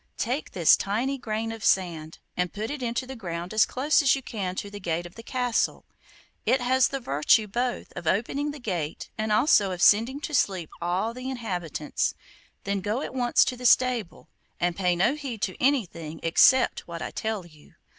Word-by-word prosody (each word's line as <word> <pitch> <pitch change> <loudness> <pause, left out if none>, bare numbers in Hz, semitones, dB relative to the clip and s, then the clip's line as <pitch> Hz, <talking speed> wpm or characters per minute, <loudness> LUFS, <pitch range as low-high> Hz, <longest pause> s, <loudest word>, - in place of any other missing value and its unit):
Take 255 +6 -2
this 170 -4 +6
tiny 250 +7 -2
grain 225 0 -3
of 225 -2 -8
sand, 165 -5 0 0.2
and 180 -1 -1
put 215 +4 -4
it 290 -2 -5
into 240 +1 -2
the 265 +1 -8
ground 175 -4 -5
as 215 - +4
close 285 +5 +2
as 275 -2 +4
you 270 - -6
can 190 -6 -4
to 200 +1 -5
the 205 - -7
gate 175 -2 -2
of 175 - -10
the 230 - -10
castle. 245 0 -1 0.6
It 255 +4 +2
has 255 +1 +3
the 275 - -4
virtue 185 - +3
both 240 +4 -3
of 170 - -6
opening 270 - 0
the 295 - -6
gate 175 - -4
and 215 0 -2
also 210 -3 +4
of 180 - -5
sending 230 +9 +4
to 300 - -5
sleep 190 - 0
all 185 +6 -1
the 255 +2 -6
inhabitants. 180 - -3 0.5
Then 200 0 -1
go 215 +8 -2
at - - -6
once 245 -2 +3
to 255 - -2
the 250 0 0
stable, 245 -6 +2 0.3
and 175 0 0
pay 180 -2 +1
no 205 +10 +3
heed 270 -8 -6
to 185 - -3
anything 170 - 0
except 255 +10 +4
what 170 -1 -6
I - - -5
tell 220 -4 -3
you. 155 -3 -19
215 Hz, 195 wpm, -26 LUFS, 180-255 Hz, 0.6 s, this